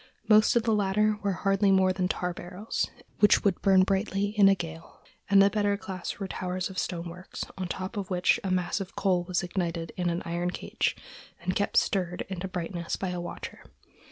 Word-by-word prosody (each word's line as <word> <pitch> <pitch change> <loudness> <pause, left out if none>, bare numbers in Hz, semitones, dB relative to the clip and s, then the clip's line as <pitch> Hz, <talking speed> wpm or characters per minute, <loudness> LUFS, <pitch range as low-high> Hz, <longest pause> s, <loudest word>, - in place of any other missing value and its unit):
Most 215 +1 +6
of 235 - +3
the 225 -1 +2
latter 210 +1 +2
were 200 -2 0
hardly 195 +2 +2
more 190 -1 +4
than 185 -1 0
tar 180 -1 -2
barrels, 180 +5 -4 0.3
which 210 - +5
would 195 -3 +1
burn 190 -1 +5
brightly 195 +1 0
in 205 -2 +5
a 195 - +5
gale, 165 -2 -8 0.3
and 200 -1 +6
the 200 - +5
better 205 -1 +1
class 190 -2 -6
were 195 - -4
towers 185 0 -3
of 185 - -3
stonework, 175 +1 -5 0.2
on 185 -1 -3
top 190 +4 -5
of 195 -2 -3
which 180 -1 +2
a 195 - -2
mass 185 +2 0
of 190 0 -7
coal 185 -3 +1
was 180 +1 -1
ignited 170 -2 -3
in 175 -1 0
an 170 +1 -2
iron 175 +1 -1
cage, - - -2 0.4
and 185 +1 -2
kept 205 - 0
stirred 180 -3 +1
into 190 -1 -4
brightness 175 -1 -3
by 190 - -3
a 180 -1 -3
watcher. 175 - -7
185 Hz, 200 wpm, -28 LUFS, 180-200 Hz, 0.4 s, Most